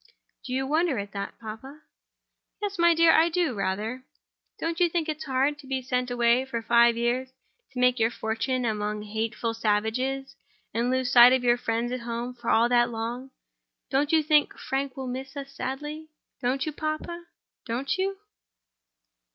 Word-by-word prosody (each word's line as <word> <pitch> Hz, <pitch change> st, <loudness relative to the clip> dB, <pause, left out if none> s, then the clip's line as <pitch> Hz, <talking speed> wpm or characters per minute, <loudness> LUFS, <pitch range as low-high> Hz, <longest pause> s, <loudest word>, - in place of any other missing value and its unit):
"Do -, -, -8 dB
you 265 Hz, +1 st, 0 dB
wonder 310 Hz, 0 st, +1 dB
at 200 Hz, 0 st, -4 dB
that, 200 Hz, 0 st, -5 dB
papa?" 235 Hz, +7 st, -9 dB, 0.8 s
"Yes, 400 Hz, -3 st, -4 dB
my 340 Hz, 0 st, +5 dB
dear; 330 Hz, 0 st, +6 dB
I 325 Hz, +1 st, +5 dB
do, 340 Hz, -5 st, 0 dB
rather." 210 Hz, +5 st, -3 dB, 0.6 s
"Don't 330 Hz, +1 st, -2 dB
you 350 Hz, -1 st, +4 dB
think 330 Hz, -1 st, -1 dB
it's 310 Hz, 0 st, -4 dB
hard 275 Hz, +2 st, +1 dB
to 275 Hz, -, -13 dB
be 265 Hz, -1 st, -2 dB
sent 250 Hz, 0 st, -1 dB
away 240 Hz, +1 st, +3 dB
for 235 Hz, -4 st, -4 dB
five 235 Hz, 0 st, +5 dB
years, 245 Hz, +2 st, 0 dB, 0.4 s
to 255 Hz, -, -6 dB
make 250 Hz, 0 st, +3 dB
your 225 Hz, 0 st, +3 dB
fortune 235 Hz, +3 st, -2 dB
among 210 Hz, -1 st, -2 dB
hateful 220 Hz, +2 st, -2 dB
savages, 225 Hz, +5 st, -1 dB, 0.4 s
and 235 Hz, +2 st, 0 dB
lose 255 Hz, -1 st, 0 dB
sight 245 Hz, +1 st, +9 dB
of 260 Hz, -1 st, +1 dB
your 240 Hz, -1 st, +4 dB
friends 230 Hz, +1 st, -1 dB
at 255 Hz, -, -2 dB
home 235 Hz, +1 st, -4 dB
for 240 Hz, -1 st, -5 dB
all 230 Hz, +1 st, +4 dB
that 240 Hz, 0 st, +3 dB
long 235 Hz, +3 st, -4 dB
time? -, -, -46 dB, 0.6 s
Don't 285 Hz, +2 st, +1 dB
you 320 Hz, -1 st, +4 dB
think 300 Hz, -1 st, +3 dB
Frank 270 Hz, 0 st, -3 dB
will 265 Hz, -, -4 dB
miss 265 Hz, +2 st, -6 dB
us 275 Hz, 0 st, -6 dB
sadly? 295 Hz, +5 st, -5 dB, 0.3 s
Don't 260 Hz, +2 st, 0 dB
you, 310 Hz, -, -2 dB
papa?—don't 310 Hz, -2 st, -5 dB
you?" 390 Hz, +1 st, -1 dB
255 Hz, 175 wpm, -26 LUFS, 235-290 Hz, 0.8 s, sight